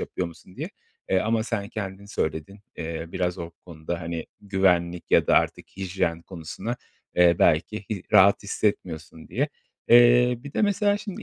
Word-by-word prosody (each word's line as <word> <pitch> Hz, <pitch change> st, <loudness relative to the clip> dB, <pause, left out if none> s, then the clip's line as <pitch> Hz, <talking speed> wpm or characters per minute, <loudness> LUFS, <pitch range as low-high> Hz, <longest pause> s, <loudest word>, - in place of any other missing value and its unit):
yapıyor 90 Hz, -, -3 dB
musun 85 Hz, +2 st, -14 dB
diye. -, -, -4 dB, 0.4 s
Eee, 95 Hz, -, +4 dB
ama 110 Hz, 0 st, +1 dB
sen, 105 Hz, -3 st, -3 dB
kendin 100 Hz, -2 st, -6 dB
söyledin. 90 Hz, +1 st, -3 dB, 0.2 s
Eee, 80 Hz, 0 st, -4 dB
biraz 90 Hz, 0 st, -1 dB
o 85 Hz, -1 st, -6 dB
konuda, 85 Hz, 0 st, -7 dB
hani, 85 Hz, -1 st, -4 dB
güvenlik 90 Hz, -3 st, +1 dB
ya -, -, +5 dB
da -, -, +4 dB
artık -, -, +1 dB
hijyen 90 Hz, -3 st, -2 dB
konusuna, 95 Hz, +7 st, -6 dB, 0.4 s
eee, 85 Hz, -1 st, +6 dB
belki 90 Hz, +6 st, +2 dB
i 100 Hz, -4 st, -3 dB
rahat 100 Hz, +2 st, +6 dB
hissetmiyorsun 85 Hz, -6 st, -3 dB
diye. -, -, 0 dB, 0.4 s
Eee, 120 Hz, 0 st, +6 dB
bir 140 Hz, -, -8 dB
de -, -, 0 dB
mesela 205 Hz, 0 st, +2 dB
şimdi 205 Hz, -3 st, -7 dB
95 Hz, 160 wpm, -25 LUFS, 85-110 Hz, 0.4 s, eee